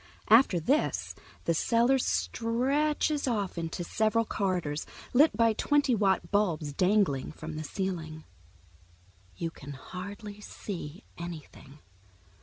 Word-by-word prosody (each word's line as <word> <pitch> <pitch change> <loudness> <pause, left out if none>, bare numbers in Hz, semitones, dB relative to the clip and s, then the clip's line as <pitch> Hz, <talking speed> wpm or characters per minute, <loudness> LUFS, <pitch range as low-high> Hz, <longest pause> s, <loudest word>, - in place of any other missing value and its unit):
After 225 -6 +6
this 275 - 0 0.3
the 170 - +2
cellar 235 - +3
stretches 280 +6 0
off 205 -6 -1
into 170 +1 -3
several 220 +5 +1
corridors, 180 -9 -1 0.3
lit 275 -3 +5
by 230 -1 +4
twenty 285 +3 +2
watt 195 -3 +1
bulbs 170 -8 +1
dangling 185 -5 +2
from 155 0 -7
the 155 - -4
ceiling. 160 -2 -4 1.1
You 165 - -3
can 145 -2 -9
hardly 200 - -8
see 175 -5 -7 0.2
anything. 155 -4 -9
195 Hz, 110 wpm, -29 LUFS, 165-230 Hz, 1.1 s, After